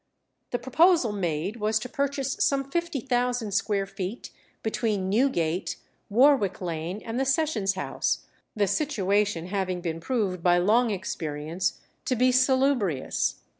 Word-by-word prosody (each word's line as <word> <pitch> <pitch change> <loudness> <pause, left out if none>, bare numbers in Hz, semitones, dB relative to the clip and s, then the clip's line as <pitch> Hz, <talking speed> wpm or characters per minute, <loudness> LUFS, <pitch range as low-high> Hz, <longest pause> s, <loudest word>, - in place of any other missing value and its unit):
The 245 - -1
proposal 315 - +3
made 180 +1 -2
was 215 0 +1
to 220 - -4
purchase 280 -1 -1
some 275 -1 +2
fifty 340 -4 -1
thousand 245 -3 0
square 200 -1 0
feet 195 +4 -6 0.3
between 215 -4 -1
Newgate, 185 -8 +1 0.3
Warwick 235 -4 +4
Lane, 175 +2 -4
and 230 +2 -3
the - - +2
Sessions 265 -8 +1
House, 190 - -2 0.3
"the 210 -2 +2
situation 205 - 0
having 185 -2 -1
been 165 -2 -3
proved 195 -4 -1
by 175 0 +4
long 220 +7 +3
experience 170 -2 -3 0.2
to 255 - +1
be 255 +2 +4
salubrious." 255 - +1
210 Hz, 130 wpm, -26 LUFS, 185-255 Hz, 0.3 s, Warwick